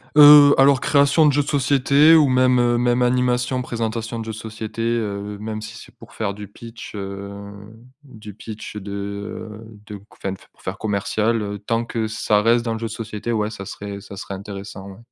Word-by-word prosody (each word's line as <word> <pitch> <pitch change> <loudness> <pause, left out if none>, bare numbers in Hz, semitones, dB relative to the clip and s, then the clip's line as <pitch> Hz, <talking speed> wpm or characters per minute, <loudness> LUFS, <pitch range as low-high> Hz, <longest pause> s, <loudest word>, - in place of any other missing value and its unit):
Heu, 145 -1 +9
alors, 135 0 +5
création 140 +2 +4
de 145 - +4
jeux 145 +1 +2
de - - -14
société 140 +2 +4
ou 155 -3 +5
même, 130 0 +3
heu, 120 0 +2
même 120 +1 +1
animation, 125 0 +1
présentation 115 -1 -4
de 110 - -5
jeux 110 - -4
de 110 - -8
société, 110 0 -7
heu, 105 -3 -2
même 110 0 -5
si 110 +1 -9
c'est - - -14
pour - - -16
faire 105 -3 -3
du 105 0 -9
pitch, 115 +3 -11
heu, 100 0 -6 0.7
du 110 -7 -12
pitch 110 +1 -9
de, 100 -1 -7
heu, 100 +2 -6 0.2
de 105 - -7
qu 100 - -19
enfin, 95 - -5 0.2
pour - - -26
faire - - -5
commercial, 110 +2 -1
heu, 100 0 -5
tant 115 +3 -1
que 115 -2 -3
ça 110 -1 +1
reste 115 +2 +3
dans 115 - -1
le 110 - -5
jeu 115 - -3
de - - -9
société, 110 0 -5
ouais, 105 -1 0
ça 100 -2 -8
serait 100 +1 -7
ça 100 0 -11
serait 100 0 -7
intéressant, 100 0 -8
ouais. 95 - -12
110 Hz, 210 wpm, -21 LUFS, 105-125 Hz, 0.7 s, Heu